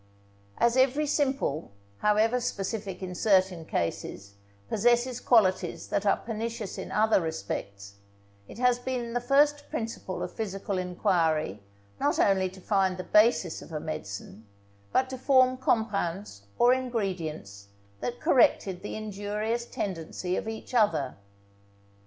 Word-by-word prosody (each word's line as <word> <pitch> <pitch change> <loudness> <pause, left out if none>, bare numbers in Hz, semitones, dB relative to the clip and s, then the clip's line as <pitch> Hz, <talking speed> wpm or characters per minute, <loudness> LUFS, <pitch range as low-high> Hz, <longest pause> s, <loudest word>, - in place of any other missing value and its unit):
As 235 +1 +3
every 270 +3 +3
simple, 270 - 0 0.3
however 215 +4 +3
specific 195 -4 -4
in 180 -1 -4
certain 185 -4 +2
cases, 100 - -3 0.3
possesses 240 - +2
qualities 185 -8 +2
that 205 +1 0
are - - +4
pernicious 225 -2 -5
in - - -6
other 215 -2 +3
respects, 100 - -5 0.5
it - - -11
has 250 0 +3
been 245 -2 -3
the 245 - 0
first 290 +3 +3
principle 225 - -4
of - - -5
physical 195 -3 -3
enquiry 165 - 0 0.4
not - - +1
only 190 -2 +3
to 190 +1 -13
find 190 -1 +1
the 185 - -4
basis 210 -6 +3
of - - -12
a 155 - -3
medicine, 105 -7 -7 0.4
but 260 - +2
to 260 - -5
form 255 -1 +4
compounds 200 - -1
or 245 +1 +6
ingredients 180 - -3 0.3
that 245 0 -4
corrected 190 -7 +3
the 205 - -5
injurious 215 +2 -3
tendency 180 -1 -3
of - - -3
each 225 +3 -7
other. 165 - +2
205 Hz, 130 wpm, -28 LUFS, 175-240 Hz, 0.5 s, or